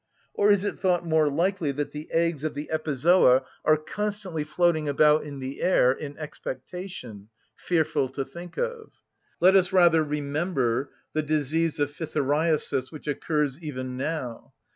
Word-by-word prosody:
Or 205 - +3
is 200 -1 +3
it 205 - -3
thought 180 -2 +1
more 160 -2 +3
likely 170 +1 0
that 145 +1 -3
the 150 +1 -7
eggs 165 -3 +1
of 155 - -2
the 145 +2 -6
epizoa 150 -3 +4 0.2
are 155 - +4
constantly 190 0 -4
floating 155 0 +1
about 150 +2 +4
in 145 -2 -7
the 130 0 -6
air 130 -8 +4
in 140 +2 -6
expectation? 130 - -7 0.3
(Fearful 155 -5 0
to 135 -1 -3
think 170 +6 -11
of!) 480 -2 -3 0.5
Let 185 +2 +6
us 185 -1 +4
rather 170 -4 +5
remember 145 -3 -1 0.2
the 155 - +1
disease 155 +2 0
of 145 -1 +1
phthiriasis, 150 -3 0
which 155 - -10
occurs 150 -1 -1
even 130 -5 -5
now. 130 -4 -4
155 Hz, 150 wpm, -26 LUFS, 140-170 Hz, 0.5 s, Let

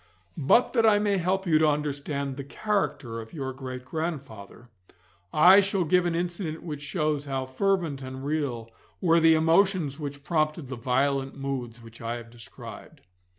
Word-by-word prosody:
But 155 - +4
that 230 -3 +3
I 215 -2 +6
may 205 -2 +1
help 190 +2 0
you 160 -3 +4
to 155 - +4
understand 140 -2 -2
the 140 - -6
character 140 - -2
of 110 - -13
your 135 -4 -4
great 130 -1 -7
grandfather, 130 - -6 0.6
I 180 +6 +8
shall 195 -2 +1
give 175 +2 +3
an 170 - -1
incident 170 -2 -3
which 150 -4 -6
shows 150 -1 -1
how 135 -2 -2
fervent 160 +1 0
and 130 +1 -7
real 135 -7 -2 0.3
were 170 -2 +4
the 160 0 +6
emotions 165 -2 +2
which 145 -1 -6
prompted 155 -2 -1
the 135 - -4
violent 135 +3 0
moods 125 -4 -5
which 115 0 -13
I 115 +1 -3
have 115 -1 -9
described. 115 -1 -11
145 Hz, 165 wpm, -27 LUFS, 130-170 Hz, 0.6 s, I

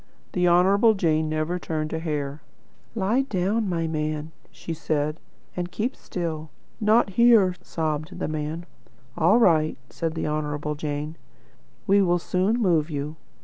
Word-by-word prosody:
The 180 -1 +2
Honourable 195 +6 +5
Jane 160 -4 +1
never 155 +3 -1
turned 155 -2 -3
a 160 - -1
hair. 150 -3 -3 0.5
'Lie 220 +5 +2
down, 210 -2 0
my 165 -2 -1
man,' 155 0 -2 0.2
she 165 - -6
said, 155 0 -1 0.4
'and 180 0 -3
keep 240 +5 -2
still.' 160 -3 -4 0.3
'Not 215 -1 +3
here,' 225 -3 +5
sobbed 155 +1 -3
the - - -2
man. 155 +2 -4 0.5
'All - - +4
right,' 160 -9 +3
said 165 -1 -3
the - - -2
Honourable 150 0 -2
Jane; 150 +1 -4 0.7
'we 200 0 +4
will 175 -2 +3
soon 185 +6 0
move 170 -7 +2
you.' 150 0 -4
165 Hz, 145 wpm, -25 LUFS, 155-190 Hz, 0.7 s, Honourable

